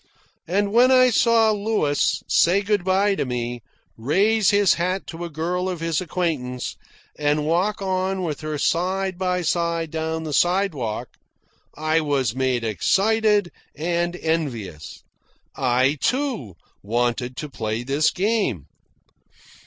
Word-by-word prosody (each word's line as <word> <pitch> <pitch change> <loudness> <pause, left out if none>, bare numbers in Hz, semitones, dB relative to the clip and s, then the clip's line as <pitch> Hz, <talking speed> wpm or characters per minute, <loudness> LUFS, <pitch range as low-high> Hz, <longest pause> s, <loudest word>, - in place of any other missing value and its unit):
And 200 +4 0
when 245 +2 +6
I 255 -1 +5
saw 230 -2 +4
Louis 205 -9 0
say 170 - +3
good 205 -2 0
bye 195 +2 +2
to - - -1
me, 120 -2 -4 0.3
raise 200 - +2
his 205 -2 +4
hat 185 +3 -2
to 165 +1 -7
a - - -6
girl 175 +4 -2
of 180 -3 -4
his 165 -1 -1
acquaintance, 150 -8 -3 0.4
and 150 0 +1
walk 185 +6 0
on 190 0 -1
with 155 -4 -3
her 155 -1 -3
side 185 +4 0
by 180 -1 0
side 170 -1 -1
down 160 0 -3
the 155 -2 -5
sidewalk, 145 - 0 0.7
I 155 +1 +1
was 140 -7 0
made 130 -2 0
excited 205 - +2 0.2
and 170 +3 -1
envious. 125 - -4 0.5
I, 130 +2 +1
too, 250 - -1 0.3
wanted 120 +3 -1
to 150 - -4
play 115 -3 -4
this 140 +4 +2
game. 195 - -1
165 Hz, 130 wpm, -22 LUFS, 135-195 Hz, 0.7 s, when